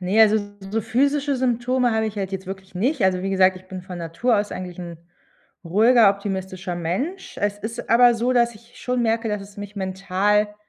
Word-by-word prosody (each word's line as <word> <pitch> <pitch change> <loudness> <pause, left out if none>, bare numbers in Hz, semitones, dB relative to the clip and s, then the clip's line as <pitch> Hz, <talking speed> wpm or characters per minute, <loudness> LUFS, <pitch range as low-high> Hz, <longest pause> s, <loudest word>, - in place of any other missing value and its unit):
Ne, 190 +4 +2
also, 220 0 +6 0.3
so 225 - 0
physische 280 +5 +1
Symptome 250 0 +1
habe 220 0 +1
ich 215 - -6
halt 195 -1 -3
jetzt 190 0 -5
wirklich 190 0 -8
nicht. 245 - 0
Also, 185 -1 +2
wie 195 - -2
gesagt, 190 -1 +4
ich 185 - -14
bin 185 -1 -7
von 180 -1 -8
Natur 170 +9 0
aus 205 0 -2
eigentlich 180 -1 -7
'n 170 -2 -7 0.7
ruhiger, 220 +5 +5
optimistischer 190 -2 -4
Mensch. 255 - -4
Es 205 0 -1
ist 220 +2 -6
aber 240 +1 +6
so, 240 +2 0
dass 235 -2 +2
ich 235 +3 -19
schon 250 -1 -1
merke, 225 0 0
dass 210 -1 -2
es 200 +1 -14
mich 205 0 -8
mental 195 +2 0
210 Hz, 200 wpm, -22 LUFS, 190-235 Hz, 0.7 s, also